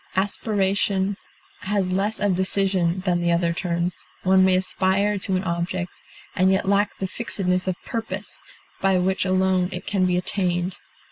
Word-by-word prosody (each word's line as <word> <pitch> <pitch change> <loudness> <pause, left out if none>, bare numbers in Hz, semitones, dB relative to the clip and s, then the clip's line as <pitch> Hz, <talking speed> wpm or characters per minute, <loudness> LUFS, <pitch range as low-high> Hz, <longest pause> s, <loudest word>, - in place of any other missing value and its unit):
Aspiration 195 0 0 0.4
has 195 -2 -1
less 200 +4 0
of 205 -2 +2
decision 190 -1 +1
than 180 -2 0
the 170 0 +2
other 170 0 +2
terms; 170 0 -2 0.2
one 190 0 +5
may 190 -1 +4
aspire 190 +2 +1
to 190 0 -1
an 185 - 0
object, 175 +1 -3 0.3
and 190 -1 +4
yet 190 0 +1
lack 200 +1 +2
the 195 - -2
fixedness 185 -3 -1
of 185 - 0
purpose 210 -3 -4 0.4
by 195 -1 +3
which 185 +1 +1
alone 185 -1 +2
it 180 - -6
can 190 -3 +1
be 180 0 +1
attained. 180 -1 -1
190 Hz, 155 wpm, -23 LUFS, 180-195 Hz, 0.4 s, one